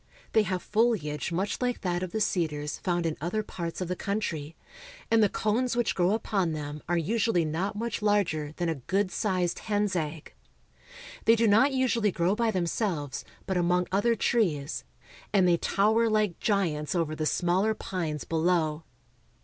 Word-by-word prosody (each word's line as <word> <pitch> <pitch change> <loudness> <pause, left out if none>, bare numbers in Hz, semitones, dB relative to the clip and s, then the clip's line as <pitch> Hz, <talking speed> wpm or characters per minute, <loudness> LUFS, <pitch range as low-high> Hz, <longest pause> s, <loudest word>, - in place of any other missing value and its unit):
They 220 - +6
have 185 -3 -2
foliage 210 - 0
much 190 +8 -2
like 245 -1 -1
that 175 -1 -1
of 185 -2 -4
the 220 - -2
cedars 155 -7 -1
found 175 -2 -1
in 160 -1 0
other 180 +7 -1
parts 170 -3 -5
of 180 - -2
the 180 - -2
country, 165 -7 -3 0.6
and 225 -1 +5
the 210 - +4
cones 235 +5 0
which 240 -1 +1
grow 180 +1 +2
upon 195 -6 0
them 150 0 -5
are 175 - +2
usually 200 0 +1
not 180 +7 -2
much 230 +1 -3
larger 190 -8 +1
than 175 - -1
a 165 - +1 0.2
good 195 0 +1
sized 185 -4 0
hen's 205 -2 0
egg. 155 -2 -4 0.9
They 225 - +6
do 230 0 +3
not 225 +7 +5
usually 240 -5 +1
grow 175 +2 +1
by 230 +1 +1
them 185 -5 0
selves, 165 - -2 0.2
but 190 - -1
among 180 +1 +2
other 205 +5 +2
trees, 165 -12 0 0.5
and 190 -3 +4
they 175 -1 +4
tower 220 +6 +2
like 215 -5 +1
giants 170 -7 0
over 160 -3 0
the 155 0 -1
smaller 185 +7 +1
pines 165 -8 -3
below. 165 -1 0
185 Hz, 175 wpm, -28 LUFS, 165-215 Hz, 0.9 s, They